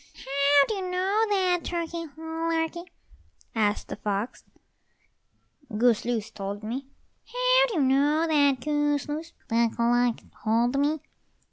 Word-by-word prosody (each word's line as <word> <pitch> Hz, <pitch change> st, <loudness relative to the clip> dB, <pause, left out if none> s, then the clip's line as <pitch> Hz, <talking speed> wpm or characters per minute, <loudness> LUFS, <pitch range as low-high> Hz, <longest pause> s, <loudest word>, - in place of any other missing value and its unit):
"How 280 Hz, +1 st, +3 dB
do -, -, -1 dB
you 395 Hz, -, -3 dB
know 385 Hz, +5 st, +1 dB
that, 370 Hz, -3 st, +2 dB
Turkey 335 Hz, -1 st, -3 dB
lurkey?" 325 Hz, +2 st, -2 dB, 0.6 s
asked 210 Hz, -2 st, 0 dB
the -, -, -5 dB
fox. 205 Hz, +4 st, -3 dB, 1.3 s
"Goose 235 Hz, -1 st, +3 dB
loose 230 Hz, -3 st, -2 dB
told 200 Hz, 0 st, -6 dB
me." 255 Hz, +5 st, -4 dB, 0.4 s
"How -, -, +3 dB
do 470 Hz, -, -5 dB
you 315 Hz, -, +2 dB
know 285 Hz, +4 st, +3 dB
that, 285 Hz, -4 st, +3 dB
Goose 295 Hz, -1 st, 0 dB
loose?" 315 Hz, +3 st, -5 dB, 0.2 s
"Duck 230 Hz, 0 st, +1 dB
luck 240 Hz, 0 st, +2 dB, 0.3 s
told 235 Hz, +5 st, +2 dB
me." 295 Hz, +1 st, +1 dB
290 Hz, 130 wpm, -26 LUFS, 240-335 Hz, 1.3 s, How